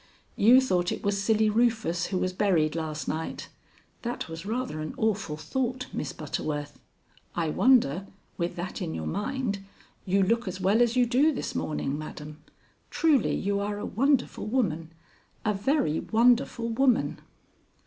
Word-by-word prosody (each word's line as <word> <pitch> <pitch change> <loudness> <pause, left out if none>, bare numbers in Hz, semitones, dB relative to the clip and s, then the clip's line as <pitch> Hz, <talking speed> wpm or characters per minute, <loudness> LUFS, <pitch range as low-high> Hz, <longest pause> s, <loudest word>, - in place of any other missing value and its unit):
You 240 +5 +7
thought 180 -8 +1
it - - -4
was 200 -1 0
Silly 220 +1 +3
Rufus 215 -6 +1
who 190 - -2
was 185 0 -1
buried 175 -6 +2
last 155 -2 -4
night. 160 +1 -4 0.5
That 240 0 -4
was 165 +3 -7
rather 240 -7 -2
an 155 - -5
awful 210 -8 -1
thought, 250 +10 -2
Miss 145 - -3
Butterworth. 145 -1 -4 0.6
I 165 -3 0
wonder, 195 - +3 0.3
with 170 -1 -2
that 175 +2 -5
in 80 - -3
your 80 -1 -4
mind, 215 - -2 0.4
you 195 +1 +2
look 230 +3 +1
as 185 +1 -4
well 195 +5 +3
as 240 0 +3
you 250 -1 +4
do 265 +6 +3
this 275 - -4
morning, 145 -1 -2
madam. 150 0 -8 0.5
Truly 300 -7 +2
you 200 0 -1
are 205 0 -2
a 205 - -4
wonderful 265 +1 +1
woman 170 -10 -1 0.5
a 215 - +2
very 200 - +1
wonderful 235 0 +2
woman." 250 +1 +2
200 Hz, 155 wpm, -27 LUFS, 165-240 Hz, 0.6 s, You